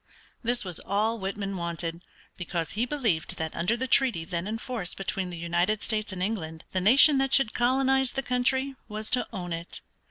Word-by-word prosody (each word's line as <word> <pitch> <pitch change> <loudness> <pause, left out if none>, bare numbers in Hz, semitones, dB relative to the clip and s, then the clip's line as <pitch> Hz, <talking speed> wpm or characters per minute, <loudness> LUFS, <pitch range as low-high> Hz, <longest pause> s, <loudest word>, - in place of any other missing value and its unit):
This 240 -2 0
was 180 -3 -2
all 215 +3 0
Whitman 195 0 -3
wanted, 170 0 -4 0.3
because 175 -2 -3
he 230 +4 -1
believed 225 - 0
that 160 -1 -3
under 220 +8 +1
the 260 - -2
treaty 250 -11 +3
then 170 +1 -3
in 220 +1 -2
force 225 -7 -4
between 195 -1 -3
the 175 - -6
United 175 +5 0
States 215 -2 -1
and 185 -1 -3
England 160 -6 -3
the 185 - 0
nation 270 +8 +7
that 270 0 +3
should 270 -5 +3
colonize 265 +1 +2
the 270 - -2
country 260 +2 +1
was 215 0 -3
to 250 - +1
own 175 -2 -4
it. 165 +1 -6
210 Hz, 190 wpm, -27 LUFS, 175-245 Hz, 0.3 s, nation